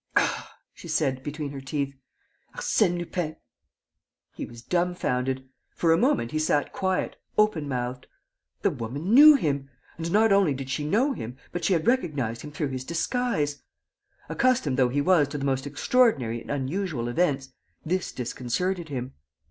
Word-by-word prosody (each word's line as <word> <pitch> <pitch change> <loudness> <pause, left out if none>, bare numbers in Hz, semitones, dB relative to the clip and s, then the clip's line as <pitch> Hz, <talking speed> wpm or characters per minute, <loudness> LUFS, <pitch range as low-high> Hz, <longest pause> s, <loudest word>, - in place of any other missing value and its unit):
"Ah!" - - 0 0.2
she - - -12
said, 140 -5 0
between 145 +1 -5
her 140 -1 -7
teeth. 140 0 -2 0.6
"Arsène 175 -5 +2
Lupin!" 175 -2 -3 1.0
He - - -6
was 120 0 -12
dumbfounded. 130 -7 -1 0.3
For 165 - +2
a - - +4
moment 240 - +2
he 155 - -1
sat 150 -1 +1
quiet, 190 -1 -1 0.2
open 210 -9 +2
mouthed. 125 -1 -3 0.6
The - - +3
woman 140 - -3
knew 300 +4 +10
him! 140 - -1 0.3
And 165 +1 -3
not 215 +2 +4
only 195 -8 +4
did 135 0 -6
she 150 +3 -2
know 255 - +2
him, 125 - -7
but 175 - -4
she 195 - +3
had 165 -3 0
recognized 145 - 0
him 150 - -8
through 145 -1 -2
his 130 -1 -4
disguise! 165 - -1 0.7
Accustomed 245 - +1
though 125 -2 +4
he 145 +3 0
was 170 -3 +4
to 145 - -5
the 140 - -3
most 135 0 0
extraordinary 145 - +2
and - - -13
unusual 145 -1 -2
events, 135 -1 0 0.3
this 185 +3 -1
disconcerted 160 +8 -2
him. 130 -2 -4
150 Hz, 160 wpm, -26 LUFS, 130-180 Hz, 1.0 s, knew